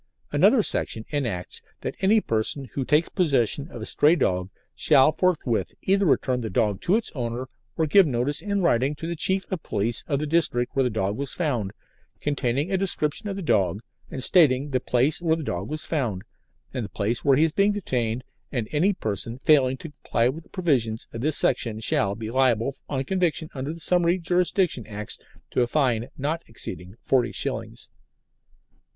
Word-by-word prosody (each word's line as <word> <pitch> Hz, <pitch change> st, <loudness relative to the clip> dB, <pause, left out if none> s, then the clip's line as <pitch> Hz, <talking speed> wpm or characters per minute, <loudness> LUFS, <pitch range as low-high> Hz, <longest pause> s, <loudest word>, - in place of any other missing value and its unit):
Another -, -, +4 dB
section 110 Hz, 0 st, -1 dB
enacts 115 Hz, -12 st, -3 dB, 0.2 s
that -, -, -3 dB
any 205 Hz, +3 st, +4 dB
person 115 Hz, -, -1 dB
who 135 Hz, -, -1 dB
takes 150 Hz, +5 st, +2 dB
possession 140 Hz, -, +1 dB
of 120 Hz, -, -8 dB
a -, -, -4 dB
stray 150 Hz, +8 st, +4 dB
dog 90 Hz, -, 0 dB, 0.2 s
shall 135 Hz, +3 st, +5 dB
forthwith 135 Hz, -, 0 dB
either 195 Hz, 0 st, +3 dB
return 130 Hz, -3 st, +1 dB
the 110 Hz, -, -4 dB
dog 105 Hz, -5 st, 0 dB
to 185 Hz, -, +2 dB
its 225 Hz, -, 0 dB
owner 120 Hz, -1 st, -4 dB, 0.3 s
or 160 Hz, -, +2 dB
give 180 Hz, +4 st, +5 dB
notice 130 Hz, +2 st, -1 dB
in 200 Hz, -1 st, -1 dB
writing 140 Hz, -2 st, +2 dB
to 145 Hz, -, -7 dB
the 170 Hz, +1 st, -3 dB
chief 190 Hz, +4 st, 0 dB
officer -, -, -8 dB
of 175 Hz, -, -3 dB
police 110 Hz, +2 st, 0 dB
of 140 Hz, -, 0 dB
the 150 Hz, -, -2 dB
district 145 Hz, -6 st, +1 dB
where 135 Hz, -, +3 dB
the 125 Hz, -, +2 dB
dog 100 Hz, -2 st, -1 dB
was 135 Hz, -2 st, -5 dB
found, 125 Hz, -, -1 dB, 0.5 s
containing 145 Hz, +3 st, -1 dB
a 190 Hz, -, +1 dB
description 180 Hz, 0 st, -1 dB
of 195 Hz, -, -3 dB
the 195 Hz, -, -5 dB
dog 95 Hz, -, +1 dB, 0.3 s
and 130 Hz, -, -3 dB
stating 145 Hz, -5 st, +4 dB
the 130 Hz, -, +1 dB
place 130 Hz, +8 st, +2 dB
where 160 Hz, -2 st, +2 dB
the 165 Hz, -, -5 dB
dog 95 Hz, -5 st, -4 dB
was 155 Hz, 0 st, -5 dB
found, 120 Hz, -, -2 dB, 0.5 s
and 130 Hz, -3 st, -2 dB
the 100 Hz, -, -6 dB
place 110 Hz, +3 st, -2 dB
where 135 Hz, -2 st, +4 dB
he 155 Hz, -, +4 dB
is 160 Hz, -, +2 dB
being 200 Hz, +5 st, +3 dB
detained, 125 Hz, -, -2 dB, 0.3 s
and 120 Hz, -6 st, -2 dB
any 175 Hz, +7 st, +2 dB
person 110 Hz, -, -3 dB
failing 135 Hz, -2 st, +3 dB
to 160 Hz, +3 st, -9 dB
comply 120 Hz, -4 st, 0 dB
with 145 Hz, +6 st, -3 dB
the -, -, -25 dB
provisions 125 Hz, -, 0 dB
of 115 Hz, -, -5 dB
this 155 Hz, +2 st, +2 dB
section 115 Hz, -3 st, +1 dB
shall 100 Hz, -2 st, +1 dB
be 110 Hz, +1 st, -6 dB
liable 130 Hz, 0 st, +2 dB
on 135 Hz, -2 st, -1 dB
conviction 170 Hz, -1 st, -1 dB
under 135 Hz, +2 st, -4 dB
the 165 Hz, -, -8 dB
Summary 175 Hz, +1 st, +3 dB
Jurisdiction 175 Hz, -, 0 dB
Acts 105 Hz, 0 st, -5 dB, 0.3 s
to -, -, +1 dB
a 120 Hz, -, +2 dB
fine 120 Hz, -4 st, +1 dB
not 155 Hz, +4 st, -2 dB
exceeding 95 Hz, -4 st, -7 dB
forty 125 Hz, -3 st, +2 dB
shillings. -, -, -4 dB
135 Hz, 195 wpm, -25 LUFS, 115-165 Hz, 0.5 s, shall